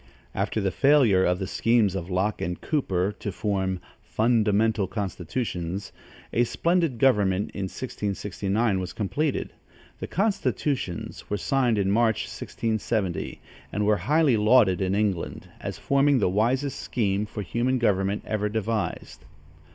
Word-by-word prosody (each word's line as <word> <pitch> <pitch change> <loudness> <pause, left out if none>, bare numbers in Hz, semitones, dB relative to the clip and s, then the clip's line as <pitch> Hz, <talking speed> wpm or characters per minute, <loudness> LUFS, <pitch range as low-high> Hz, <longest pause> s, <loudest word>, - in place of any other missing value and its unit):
After - - -1
the 100 -2 0
failure 130 -6 +4
of 90 0 +2
the 95 - -3
schemes 110 0 +2
of 95 -2 -4
Loche 95 +3 0
and 90 0 -3
Cooper 100 - 0
to 100 - -3
form 95 -1 -1 0.2
"Fundamental 110 -2 +2
Constitutions," 95 -1 -4 0.4
a 120 - +4
splendid 165 +1 +1
government, 105 -6 +2
in 95 - -4
1669, 100 -1 -2
was 90 - -5
completed. 130 - -2 0.5
The - - -4
"constitutions" 150 - -2
were 105 - 0
signed 125 +1 +1
in 100 -1 +1
March, 110 0 +2
1670, 110 -5 -3 0.3
and 105 - -1
were 105 0 +3
highly 150 -2 +3
lauded 105 -4 +4
in 95 0 +1
England, 100 -5 -1
as - - -5
forming 140 0 +3
the 100 -6 +2
wisest 125 +8 0
scheme 105 -3 -1
for 105 0 -5
human 120 +6 0
government 100 -3 +1
ever 105 -1 -1
devised. 110 0 -3
105 Hz, 135 wpm, -26 LUFS, 95-120 Hz, 0.5 s, failure